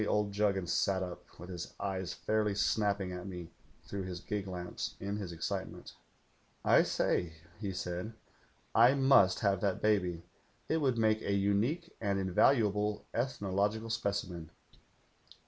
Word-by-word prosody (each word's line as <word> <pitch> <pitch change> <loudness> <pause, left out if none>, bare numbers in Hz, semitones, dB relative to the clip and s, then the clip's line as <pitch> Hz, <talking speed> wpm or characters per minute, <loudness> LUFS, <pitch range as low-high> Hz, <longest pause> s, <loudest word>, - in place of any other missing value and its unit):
d 105 - 0 0.2
Juggins 100 -3 +1
sat 95 -1 +1
up, 90 -1 -6 0.2
with 90 +2 -9
his 90 -1 -6
eyes 95 -2 -2
fairly 105 -2 0
snapping 100 -2 +1
at 90 +1 -6
me 90 -3 -7 0.3
through 100 - -5
his 90 -2 -5
gig 100 +1 -3
lamps 90 -1 -5
in 100 +1 -3
his 95 -4 -5
excitement. 85 - -4 0.7
■'T - - +6
say,' 85 -2 0 0.3
he 100 -3 -3
said. 90 +3 -4 0.6
'I 120 +4 +6
must 135 -9 +5
have 100 -3 +2
that 100 -2 0
baby. 90 -6 +1 0.4
It 160 - +1
woidd 135 -6 +1
make 110 -1 +3
a 100 - -1
unique 105 - 0
and 100 -2 +1
invaluable 105 +2 +2
ethnological 110 -2 -1
specimen.' 100 -7 -2
100 Hz, 140 wpm, -33 LUFS, 90-110 Hz, 0.7 s, ■'T